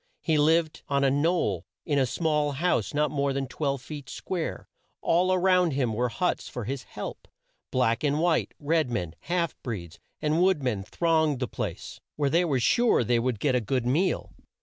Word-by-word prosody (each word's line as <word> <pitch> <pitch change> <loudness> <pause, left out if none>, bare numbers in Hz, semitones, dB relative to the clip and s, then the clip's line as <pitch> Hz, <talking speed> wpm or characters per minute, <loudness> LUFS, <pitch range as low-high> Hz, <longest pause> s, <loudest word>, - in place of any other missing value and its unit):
He 155 -3 +2
lived 160 +1 +2
on 140 0 +1
a 135 - +4
knoll, 145 - +1 0.2
in 145 -2 +1
a 130 - +2
small 150 0 0
house 175 +6 0
not 150 0 +1
more 140 -2 0
than 135 0 -1
twelve 140 -1 -2
feet 145 -4 -8
square. 180 -4 -4 0.4
All 185 +2 +3
round 180 -3 +3
him 130 -4 0
were 120 +3 +1
the - - -12
huts 180 -1 -1
for 125 - -5
his 130 +4 -3
"help," - - -8 0.4
black 125 0 +1
and 145 0 +1
white. 170 0 +1
Red 155 -1 +1
men, 90 -9 -3
half 170 +1 -1
breeds, 90 -9 -6 0.2
and 155 +3 +1
wood 185 -6 +3
men 115 -6 0
thronged 160 - +1
the 125 - -1
place, - - -5
where 145 -2 0
they 170 +2 +4
were 140 -6 +1
sure 235 - +3
they 120 +1 +2
would 120 -2 -1
get 135 +2 +1
a 125 - +2
good 120 +3 -1
meal. 160 +10 0
145 Hz, 195 wpm, -27 LUFS, 125-165 Hz, 0.4 s, a